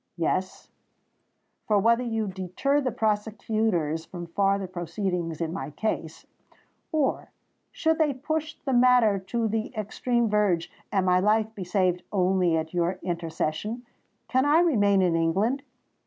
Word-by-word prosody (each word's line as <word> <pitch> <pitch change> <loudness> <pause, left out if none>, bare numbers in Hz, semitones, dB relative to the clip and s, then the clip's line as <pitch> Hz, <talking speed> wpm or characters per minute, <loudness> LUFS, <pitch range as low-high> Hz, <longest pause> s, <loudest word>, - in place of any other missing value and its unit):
Yes: 185 +3 -2 1.0
for 210 -3 +3
whether 230 +4 +3
you 225 -2 -1
deter 190 +10 -1
the 255 -2 -1
prosecutors 210 -7 0
from 175 0 -8
farther 195 +3 +1
proceedings 175 -2 -3
in 165 0 -2
my 190 - -4
case,—or, 260 - -4 0.4
should 320 0 0
they 310 -2 +3
push 310 +4 -3
the 270 - 0
matter 245 -5 +5
to 225 +4 -2
the 220 0 -2
extreme 235 +3 0
verge, 205 -5 +1 0.2
and 195 -2 +1
my 180 0 +4
life 215 +2 +2
be 200 - -6
saved 180 -1 +1
only 185 -3 +2
at 160 +1 -4
your 175 +1 0
intercession,—can 185 +9 -3
I 295 +4 +4
remain 205 - +3
in 175 -2 +2
England? 195 +12 +1
205 Hz, 130 wpm, -26 LUFS, 180-235 Hz, 1.0 s, matter